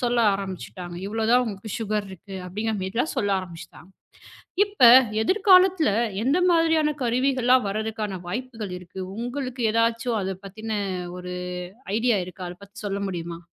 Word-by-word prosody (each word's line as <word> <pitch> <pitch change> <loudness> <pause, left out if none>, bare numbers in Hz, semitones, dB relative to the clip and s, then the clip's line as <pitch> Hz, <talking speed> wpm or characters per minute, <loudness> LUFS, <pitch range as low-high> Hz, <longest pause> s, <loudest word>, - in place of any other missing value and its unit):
சொல்ல 245 -1 +1 0.2
ஆரம்பிச்சுட்டாங்க. 175 - -6
இவ்வளவு 220 +1 -1
தான் 250 0 +5
உங்களுக்கு 210 -1 -6
சுகர் 210 -1 -1
இருக்கு 190 +1 -9
அப்படிங்கற 215 +4 -2
மாரிலாம் 225 +11 -1
சொல்ல 205 -6 +1
ஆரம்பிச்சுட்டாங்க. 175 0 -10 0.8
இப்ப 405 - +6 0.3
எதிர்காலத்துல 370 - +5 0.3
எந்த 285 +7 +3
மாதிரியான 320 -3 +3
கருவிகள்லாம் 255 -1 +2
வர்றதுக்கான 210 -2 -3
வாய்ப்புகள் 225 -2 -5
இருக்கு? 180 +1 -10 0.2
உங்களுக்கு 250 +1 -4
எதாச்சும் 230 0 +1
அத 190 0 -3
பத்தின 215 +1 -4 0.4
ஒரு 180 0 -6 0.6
ஐடியா 230 -2 +2
இருக்கா? 185 +1 -9
அத 175 - -9
பத்தி 200 - -16
சொல்ல 200 0 -2
முடியுமா? 170 -1 -5
220 Hz, 135 wpm, -24 LUFS, 190-250 Hz, 0.8 s, இப்ப